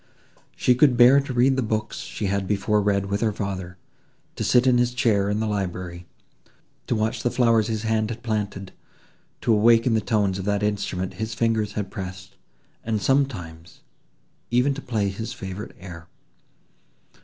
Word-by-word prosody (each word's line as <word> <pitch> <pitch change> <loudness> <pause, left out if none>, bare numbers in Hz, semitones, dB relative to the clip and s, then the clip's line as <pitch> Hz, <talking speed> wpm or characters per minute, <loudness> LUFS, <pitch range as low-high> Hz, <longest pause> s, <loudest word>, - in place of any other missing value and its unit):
She 125 - +3
could 125 0 +4
bear 125 +3 +7
to 140 - -6
read 130 +2 +3
the 130 - 0
books 110 -2 -2
she 105 - -5
had 100 0 -1
before 105 +1 +1
read 100 -1 +1
with 100 +1 -2
her 110 -2 +2
father; 95 -3 -5 0.6
to - - -3
sit 125 0 +4
in 125 -2 +4
his 120 0 +1
chair 105 -6 +2
in 105 +1 0
the 110 - 0
library—to 90 - -6
watch 110 0 -1
the 120 - +1
flowers 115 -3 +2
his 110 -1 -3
hand 110 -1 0
had 115 0 -7
planted—to 105 +1 -5
awaken 115 +2 +4
the 110 - +2
tones 100 -4 0
of 95 - -5
that 105 0 0
instrument 100 -3 -2
his 110 0 -3
fingers 110 -3 0
had 100 -3 -4
pressed, 95 0 -8 0.5
and 110 -1 -1
sometimes 95 -12 -2 0.7
even 125 +4 +2
to 145 - -7
play 110 -6 -1
his 110 +5 -5
favourite 100 -2 -7
air. 85 -3 -10
105 Hz, 165 wpm, -24 LUFS, 100-120 Hz, 0.7 s, bear